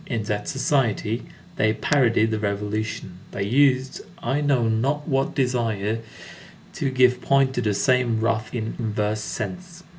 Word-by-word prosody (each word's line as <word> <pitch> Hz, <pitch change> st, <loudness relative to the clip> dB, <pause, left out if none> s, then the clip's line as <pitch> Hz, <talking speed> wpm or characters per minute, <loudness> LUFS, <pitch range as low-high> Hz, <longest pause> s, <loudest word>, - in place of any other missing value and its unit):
In 115 Hz, -5 st, -2 dB
that 105 Hz, -1 st, -3 dB
society, 120 Hz, -5 st, 0 dB, 0.3 s
they 110 Hz, 0 st, +3 dB
parodied 115 Hz, -3 st, +2 dB
the 110 Hz, -, -1 dB
Revolution. 105 Hz, -2 st, -3 dB
They 100 Hz, -, -3 dB
used 130 Hz, +3 st, +2 dB, 0.2 s
I 135 Hz, +5 st, -1 dB
know 135 Hz, -5 st, +2 dB
not 135 Hz, +7 st, 0 dB
what 135 Hz, -2 st, 0 dB
desires 115 Hz, -5 st, 0 dB, 0.7 s
to 135 Hz, -, -1 dB
give 125 Hz, -1 st, +3 dB
point 135 Hz, -1 st, +3 dB
to 125 Hz, -, -1 dB
the 105 Hz, -3 st, 0 dB
same 125 Hz, -1 st, +2 dB
wrath 110 Hz, 0 st, 0 dB
in 110 Hz, -2 st, -3 dB
inverse 105 Hz, -1 st, -1 dB
sense. 180 Hz, -, -6 dB
115 Hz, 145 wpm, -24 LUFS, 110-135 Hz, 0.7 s, they